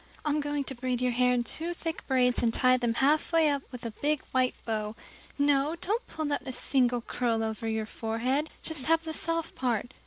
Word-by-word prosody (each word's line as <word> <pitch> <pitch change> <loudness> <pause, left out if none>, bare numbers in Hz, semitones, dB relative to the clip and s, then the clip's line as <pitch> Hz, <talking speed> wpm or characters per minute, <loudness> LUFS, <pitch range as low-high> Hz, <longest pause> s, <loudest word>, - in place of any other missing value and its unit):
I'm 300 0 +1
going 290 0 -1
to 270 - -6
braid 250 -1 -2
your 250 0 +1
hair 250 +1 +3
in 245 -1 +2
two 330 +8 -1
thick 325 -1 -4
braids, 250 -2 +3
and 235 - +2
tie 255 +2 +4
them 240 -2 0
halfway 310 +4 +3
up 280 -1 -1
with 250 -1 -8 0.2
big 295 0 +1
white 255 -1 +2
bows 215 -1 -2 0.4
no, 285 +2 +2
don't 435 +8 -1
pull 310 -2 -3
out - - -1
a - - -2
single 245 -2 +2
curl 230 -1 -1
over 220 0 -3
your 220 -1 -1
forehead 240 +8 -1
just 310 -4 0
have 325 0 +3
the 320 -1 -4
soft 330 0 +1
part. 245 -1 -1
260 Hz, 205 wpm, -29 LUFS, 240-300 Hz, 0.4 s, tie